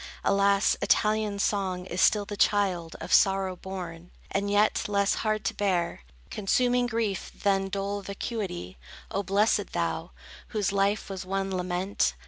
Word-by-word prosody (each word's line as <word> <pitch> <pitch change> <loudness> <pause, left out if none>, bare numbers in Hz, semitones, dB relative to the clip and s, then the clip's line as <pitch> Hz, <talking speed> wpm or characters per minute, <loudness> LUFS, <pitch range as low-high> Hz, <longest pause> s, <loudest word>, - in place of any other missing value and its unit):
Alas, 200 0 +3
Italian 215 -1 +2
song 190 -3 -1
is 185 -1 -2
still 210 -1 +4
the 205 0 -6
child 190 -5 +1
Of - - -3
sorrow 195 -1 +4
born. 180 -2 -7 0.2
And 200 +1 0
yet, 205 +1 +2
less 200 -1 +2
hard 215 -1 -1
to - - 0
bear, 180 - 0 0.3
Consuming 245 +4 +2
grief 225 -4 -2
than 195 -1 +2
dull 200 +1 -2
vacuity! 195 - -5 0.3
O 200 - 0
blessed 205 +1 +1
thou, 85 -1 -2 0.4
whose 210 -3 -1
life 200 +1 +1
was 195 -1 -5
one 195 0 -2
lament! 180 - 0
195 Hz, 140 wpm, -27 LUFS, 185-205 Hz, 0.4 s, still